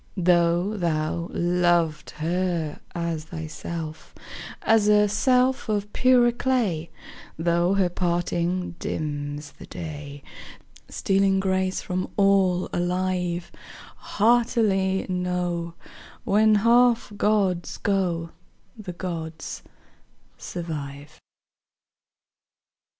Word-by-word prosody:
Though 175 +2 +2
thou 170 -1 -1
loved 175 -3 +1
her 170 -1 -2 0.2
as 170 -2 -2
thyself, 160 0 -7 0.5
As 220 -2 +4
a 210 0 +5
self 250 +4 +2
of 205 -1 -1
purer 250 -2 +4
clay, 235 -10 0 0.5
Though 170 +3 +2
her 195 -2 +3
parting 175 0 -1
dims 145 -1 -4
the - - -13
day, 145 -3 -8 0.7
Stealing 195 0 +2
grace 190 -1 0
from 185 0 -3
all 195 -3 +3
alive; 180 -1 -1 0.5
Heartily 210 -4 +2
know, 180 -2 -2 0.5
When 215 +1 +4
half 235 +1 +4
gods 200 -4 +1
go, 175 -4 -1 0.4
The 205 -5 -7
gods 165 -3 -6 0.7
survive. 150 -3 -7
180 Hz, 85 wpm, -25 LUFS, 170-200 Hz, 0.7 s, a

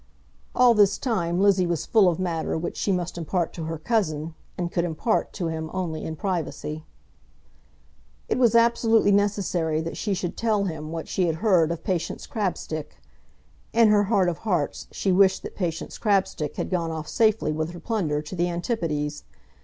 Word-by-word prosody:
All 250 -1 +6
this 205 -3 +4
time 180 -9 -1
Lizzie 195 -2 +4
was 170 -3 -1
full 210 -5 +5
of 170 - -1
matter 170 -4 -1
which 170 +2 -4
she 200 - 0
must 175 -2 -2
impart 170 +1 -1
to 165 - -5
her 165 0 -3
cousin, 160 -4 -1 0.2
and 175 -1 -2
could 170 - 0
impart 175 +6 0
to 175 -4 -3
him 160 0 -4
only 175 -4 -3
in 160 - -4
privacy. 155 -3 -3 1.4
It - - 0
was 235 -3 +4
absolutely 230 -2 +4
necessary 195 -6 +1
that 165 +1 -5
she 205 -3 -1
should 175 -1 -3
tell 215 -3 +1
him 160 -4 -4
what 165 -1 -5
she 185 -2 0
had 160 - 0
heard 175 -4 +3
of 170 - -5
Patience 180 -3 -2
Crabstick. 180 -7 -3 0.8
In 230 -1 +5
her 205 -1 +4
heart 195 -3 +2
of 170 -2 -2
hearts 180 -10 -1
she 195 - 0
wished 190 +1 +4
that - - -7
Patience 170 -4 -4
Crabstick 190 -7 0
had - - -4
gone 170 -3 0
off 160 -1 -5
safely 215 -8 +2
with 155 +1 -2
her 175 0 -9
plunder 165 -11 -1
to 155 +5 -7
the 175 0 +1
Antipodes. 165 -6 -2
175 Hz, 180 wpm, -25 LUFS, 160-205 Hz, 1.4 s, All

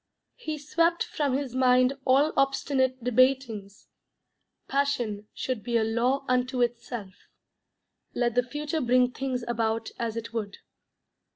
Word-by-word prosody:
He 315 -11 -4
swept 335 +4 +1
from 280 -3 -1
his 275 -3 -4
mind 255 0 +4
all 275 +4 +4
obstinate 260 -2 +1
debatings. 245 -5 +1 0.8
Passion 245 -7 -1
should 255 -4 -3
be 235 +1 0
a 225 - +2
law 245 +5 0
unto 250 0 +1
itself. 235 -4 -4 1.0
Let 240 -1 +1
the 245 - +4
future 295 +5 -3
bring 250 0 +3
things 255 -2 -3
about 225 -1 -1
as 230 -2 -2
it 230 0 -6
would. 215 -3 -4
250 Hz, 125 wpm, -27 LUFS, 235-275 Hz, 1.0 s, mind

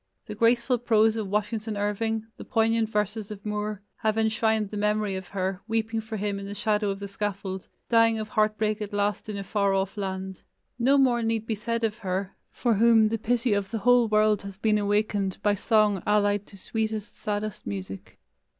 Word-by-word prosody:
The - - -6
graceful 235 +3 +2
prose 220 -2 +3
of 220 -3 -3
Washington 210 +1 -2
Irving, 215 +2 -1
the - - -9
poignant 225 -1 +1
verses 210 0 -2
of 210 -1 -9
Moore, 210 -1 -3
have 220 0 0
enshrined 220 -1 +1
the - - -5
memory 210 -1 0
of 190 -1 -6
her, 190 0 -3
weeping 225 0 -1
for 220 0 -6
him 200 0 -2
in 200 - -7
the 205 - -6
shadow 210 -1 0
of 195 0 -3
the 200 - -5
scaffold, 195 -2 -4 0.2
dying 230 -1 +4
of 215 -1 -4
heart 215 0 +1
break 215 0 0
at 210 0 -5
last 205 +1 -1
in 210 - -4
a 200 - -4
far 200 0 +1
off 195 +2 -1
land. 190 -1 -4 0.4
No 265 +4 +4
more 250 -3 +3
need 225 -1 -1
be 225 - -1
said 230 +2 -2
of 220 0 -1
her, 190 -1 -3 0.2
for 240 -2 +1
whom 225 0 +5
the 225 0 -2
pity 240 +1 +1
of 200 -1 -1
the 230 - -2
whole 245 +2 +4
world 215 -1 +3
has 200 -1 -9
been 215 0 +2
awakened 205 -2 0
by 205 - +4
song 210 -2 +2
allied 205 -1 +2
to 200 - -14
sweetest, 220 +1 -3
saddest 210 -1 -4
music. 95 -1 -6
210 Hz, 200 wpm, -26 LUFS, 200-225 Hz, 0.4 s, whom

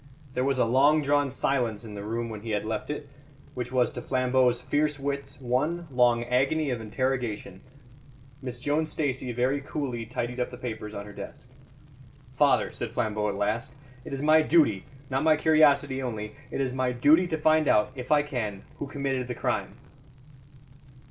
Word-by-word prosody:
There 125 - 0
was 135 0 +1
a 125 - +3
long 140 +6 +4
drawn 145 0 +2
silence 120 -4 -1
in 105 - -8
the 100 - -6
room 115 +2 -3
when 110 -2 -7
he 115 - -7
had 105 -1 -1
left 110 +5 -3
it, 150 -1 -4 0.5
which 125 -1 -5
was 125 -1 +2
to - - -6
Flambeau's 130 -1 +2
fierce 145 +3 0
wits 140 0 -4
one 145 +7 -1
long 120 -2 +3
agony 135 +5 +1
of 120 -2 -3
interrogation. 110 -3 -2 0.8
Miss 125 -2 -5
Joan 150 +5 0
Stacey 135 -5 -2
very 130 +4 0
coolly 130 -5 -4
tidied 125 +1 -3
up 125 - 0
the - - -9
papers 110 -3 -6
on 100 - -5
her 105 - -10
desk. - - -9 0.9
"Father," - - +3
said - - -5
Flambeau 105 -1 0
at 100 - -3
last, 105 +6 -2 0.3
"it - - -9
is 135 +1 -3
my 155 +1 +6
duty, 150 - +3 0.3
not 135 +2 +1
my 155 -1 +5
curiosity 145 -4 +4
only 110 -4 -4 0.2
it - - -4
is 130 -2 -1
my 130 -1 0
duty 150 +9 +4
to 160 -2 -1
find 155 -1 +3
out, 105 +3 +3
if 130 0 -7
I 150 -1 +5
can, 115 -9 -4 0.2
who 145 - -3
committed 135 -3 -2
the 125 - -4
crime." - - -2
130 Hz, 180 wpm, -27 LUFS, 120-145 Hz, 0.9 s, my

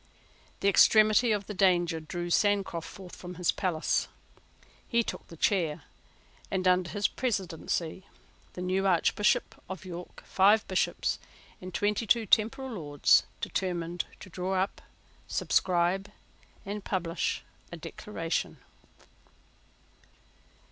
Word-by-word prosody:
The - - +2
extremity 215 +3 +6
of 205 -2 0
the 210 - -6
danger 180 -4 +2
drew 175 +2 -5
Sancroft 195 -4 +1
forth 185 -2 -11
from 180 0 -9
his 180 0 +1
palace. 170 -4 0 0.8
He 235 -1 +2
took - - -6
the 165 - -12
chair; 160 -5 +1 0.7
and, 185 -1 0
under 180 -1 +3
his 205 -2 +1
presidency, 185 -5 -3 0.5
the 180 - -5
new 190 +2 +1
Archbishop 190 +3 +2
of 190 -2 -7
York, 175 -1 -8
five 205 +3 +4
Bishops, 185 - 0 0.4
and 185 0 -7
twenty 210 +4 0
two 230 +1 +3
temporal 225 +6 +2
Lords, 145 -9 +3 0.2
determined 175 -2 -2 0.2
to 190 - -11
draw 185 +2 -2
up, 190 +1 -1 0.5
subscribe, 185 +2 +1 0.6
and 205 +1 -5
publish 170 -4 -2 0.3
a - - -6
Declaration. - - -4
185 Hz, 115 wpm, -29 LUFS, 175-205 Hz, 0.8 s, extremity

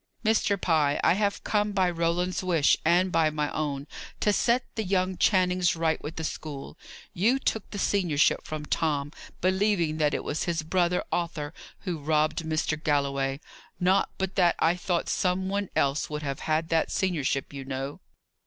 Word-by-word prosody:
Mr. 215 -2 +2
Pye, 150 -5 +2
I - - +5
have 200 +1 -1
come 210 -1 0
by 190 -2 +3
Roland's 175 +1 0
wish, 170 -5 +3
and 180 +3 +3
by 160 -2 +3
my 150 -1 -2
own, 145 -2 -2 0.4
to 210 - +3
set 240 +4 +2
the 220 - -2
young 185 -1 0
Channings 180 -2 +2
right 160 -1 0
with 150 +2 -6
the 160 - -4
school. 150 -3 -6 0.4
You 225 +9 +3
took 220 -5 -2
the 205 - -6
seniorship 175 -7 +2
from 155 -1 -5
Tom, 145 -2 -1 0.3
believing 185 -4 +1
that 150 -2 +2
it - - -3
was 150 - -2
his 165 -2 -1
brother 180 +2 +1
Arthur 165 -3 -2 0.3
who 175 -5 -3
robbed 155 +1 +1
Mr. 155 -1 -2
Galloway. 140 -2 0 0.4
Not 185 +2 +3
but 190 0 -2
that 175 -3 +4
I 165 +2 +3
thought 180 -1 -1
some 185 +1 0
one 200 -1 -1
else 140 +1 +1
would 150 0 -4
have 140 -2 -3
had 160 +1 -1
that 165 -1 +2
seniorship, 150 -8 -1
you 135 -1 -6
know!" 135 +1 -5
165 Hz, 170 wpm, -27 LUFS, 150-185 Hz, 0.4 s, I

